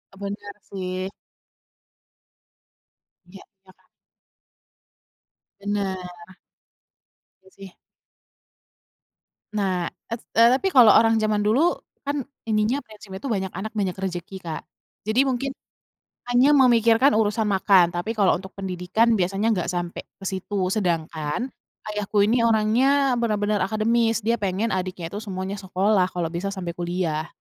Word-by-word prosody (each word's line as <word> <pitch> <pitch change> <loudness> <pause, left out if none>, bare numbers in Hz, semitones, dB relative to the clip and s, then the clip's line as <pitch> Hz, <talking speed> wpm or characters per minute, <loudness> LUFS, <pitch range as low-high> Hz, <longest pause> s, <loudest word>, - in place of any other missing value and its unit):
Bener 200 +1 -6 0.2
sih. 185 0 -4 2.2
Iya, 195 +2 -14 0.2
ya 185 - -17
kan? - - -35 1.7
Bener. 200 -2 -2 1.5
Iya 190 - -20
sih. 195 -1 -11 1.9
Nah 185 -4 0 0.2
et 230 - -3 0.2
eee, 230 +1 +7
tapi 330 +9 -1
kalau 235 -5 +9
orang 225 +1 +5
zaman 215 -1 +1
dulu 220 +7 +3 0.4
kan 285 -1 -1 0.2
ininya 215 +4 +1
prinsipnya 205 -3 -11
itu 275 - -3
banyak 190 -3 -1
anak 215 +2 -4
banyak 190 -3 -1
rezeki, 190 -1 -5
Kak. 160 -2 -5 0.5
Jadi 220 +3 +1
mungkin 265 +1 -1 0.8
hanya 260 +4 +5
memikirkan 235 -1 +5
urusan 215 0 +1
makan 190 -3 +4
tapi 175 +6 -3
kalau 200 -4 +3
untuk 190 +1 -11
pendidikan 190 +4 0
biasanya 195 +5 +1
gak 180 - -2
sampai 175 -1 -4
ke 195 - -16
situ. 190 0 -2
Sedangkan 170 - -2 0.4
ayahku 210 0 0
ini 230 +3 +3
orangnya 245 +4 +3
bener-bener 210 -2 0
akademis 225 +1 +1
dia 230 +2 +1
pengen 200 +2 -1
adiknya 185 -2 -3
itu 205 - -5
semuanya 195 -1 -5
sekolah 190 0 +1
kalau 170 -2 -2
bisa 175 +3 -4
sampai 180 -3 -4
kuliah. 170 -3 -2
205 Hz, 125 wpm, -24 LUFS, 185-225 Hz, 2.2 s, kalau